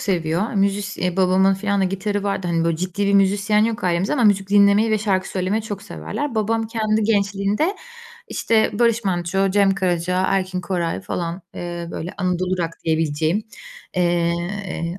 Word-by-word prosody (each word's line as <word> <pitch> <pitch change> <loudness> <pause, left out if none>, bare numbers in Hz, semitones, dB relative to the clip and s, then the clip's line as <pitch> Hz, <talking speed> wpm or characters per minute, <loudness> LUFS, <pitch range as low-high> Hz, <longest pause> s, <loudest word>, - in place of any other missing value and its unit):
seviyor. 175 +2 -1
Müzis 200 +1 0
ya 180 0 -1
babamın 190 +1 +4
filan 200 +1 -1
da - - +3
gitarı 195 +2 -2
vardı, 195 -2 -2
hani, 165 -1 0
böyle, 165 -1 +1
ciddi 185 +4 -2
bir 200 - +2
müzisyen 200 +2 +3
yok 230 -1 -2
ailemizde 175 +2 +1
ama 255 -5 +2
müzik 200 -2 +3
dinlemeyi 205 +2 +4
ve 215 - +2
şarkı 195 -3 0
söylemeyi 190 +4 -1
çok 205 -2 -6
severler. 235 +8 -5
Babam 225 +1 0
kendi 220 -1 0
gençliğinde, 205 - +1 0.5
işte, 220 -1 +1
Barış 230 -1 +2
Manço, 190 +1 0
Cem 195 0 +3
Karaca, 180 -1 0
Erkin 185 -1 0
Koray 175 -2 -2
falan, 175 -1 -4
eee, 175 -1 -5
böyle 170 +2 -6
Anadolu 185 -1 -1
Rock 165 -1 -1
diyebileceğim, 160 +4 0 0.5
eee, 175 +1 -1
195 Hz, 160 wpm, -21 LUFS, 175-205 Hz, 0.5 s, babamın